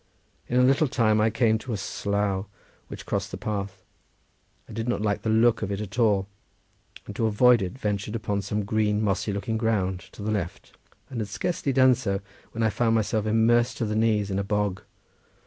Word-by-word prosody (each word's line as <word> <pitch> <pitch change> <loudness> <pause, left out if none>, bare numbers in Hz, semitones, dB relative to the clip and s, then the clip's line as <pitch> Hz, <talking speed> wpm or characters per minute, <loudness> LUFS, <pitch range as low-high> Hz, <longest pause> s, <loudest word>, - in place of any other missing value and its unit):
In 125 - +1
a - - +5
little 135 +4 +4
time 110 -4 +2
I 110 - +3
came 110 -1 +2
to 120 +1 -5
a - - -1
slough 100 0 -2 0.4
which - - -9
crossed - - -2
the - - -6
path. 100 -2 -4 0.8
I - - -11
did 115 +3 -3
not 120 - 0
like 105 -2 0
the 110 - -2
look 115 +1 +3
of 100 -2 -2
it 100 - -2
at 105 +3 -6
all; 105 -4 +3 0.8
and - - -8
to 115 - +1
avoid 120 +2 +5
it 95 +4 -4
ventured 105 -2 -2
upon 105 -3 -2
some 105 +1 -2
green 105 0 +1
mossy 100 0 0
looking 100 +3 -2
ground 100 -5 0
to 100 - -9
the 110 - -1
left, 90 -5 -4 0.4
and 125 - -4
had 105 - -3
scarcely 165 - -2
done 130 0 +5
so 105 -6 -2 0.3
when 115 - -2
I 110 - +2
found 115 +1 +1
myself 110 -1 0
immersed 115 +2 +3
to 115 - -1
the 105 0 -2
knees 110 -2 +1
in 95 - 0
a - - 0
bog. 105 -1 -1
110 Hz, 205 wpm, -26 LUFS, 100-115 Hz, 0.8 s, a